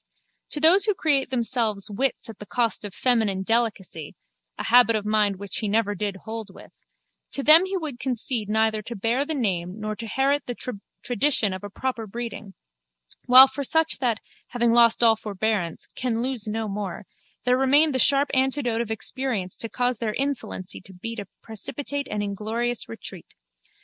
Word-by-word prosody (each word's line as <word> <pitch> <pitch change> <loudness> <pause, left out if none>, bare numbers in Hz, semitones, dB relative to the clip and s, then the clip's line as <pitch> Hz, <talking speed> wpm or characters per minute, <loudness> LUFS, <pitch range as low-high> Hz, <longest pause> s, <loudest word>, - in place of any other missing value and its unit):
To 295 - 0
those 355 +6 +7
who 420 -2 +1
create 290 -7 +1
themselves 230 -5 -1
wits 260 +6 -1
at 225 -3 -11
the 210 - -10
cost 235 -3 0
of 205 -2 -7
feminine 220 -7 +1
delicacy 200 -8 -1 0.4
(a - - -4
habit 240 -1 +5
of 210 -1 -2
mind 210 -2 +1
which 200 +1 -5
he 215 - -1
never 210 -1 +1
did 205 0 -3
hold 220 -2 -6
with) - - -15 0.6
to 275 - 0
them 320 +5 +9
he 385 0 -2
would 300 -8 -5
concede 245 -4 -1
neither 220 0 +1
to 235 +3 -8
bear 230 +7 0
the 320 - -2
name 185 -6 -2
nor 215 0 -4
to 230 - -7
herit 275 +6 +1
the 245 - -4 0.5
tradition 245 -4 +1
of 185 - -7
a 205 - -6
proper 230 +1 -4
breeding: 220 -2 -7 0.7
while 255 +2 +10
for 280 +2 -5
such 320 +2 +1
that, 235 -4 0 0.3
having 235 -1 +1
lost 235 0 +5
all 225 -1 +6
forbearance, 210 -4 -3
can 235 -2 -2
lose 250 -4 -3
no 220 +1 -3
more, 200 -2 -5 0.4
there 250 0 +4
remained 280 +4 +4
the 260 - 0
sharp 280 +2 +3
antidote 260 -3 +1
of 235 - -5
experience 220 -4 -3
to 230 - -4
cause 245 -1 -1
their 220 -3 -2
insolency 270 -9 -3
to 190 - -15
beat 230 +5 -6
a 200 - -7 0.2
precipitate 280 +5 -4
and 210 -1 -2
inglorious 220 - -2
retreat. 115 - -10
230 Hz, 180 wpm, -24 LUFS, 210-260 Hz, 0.7 s, while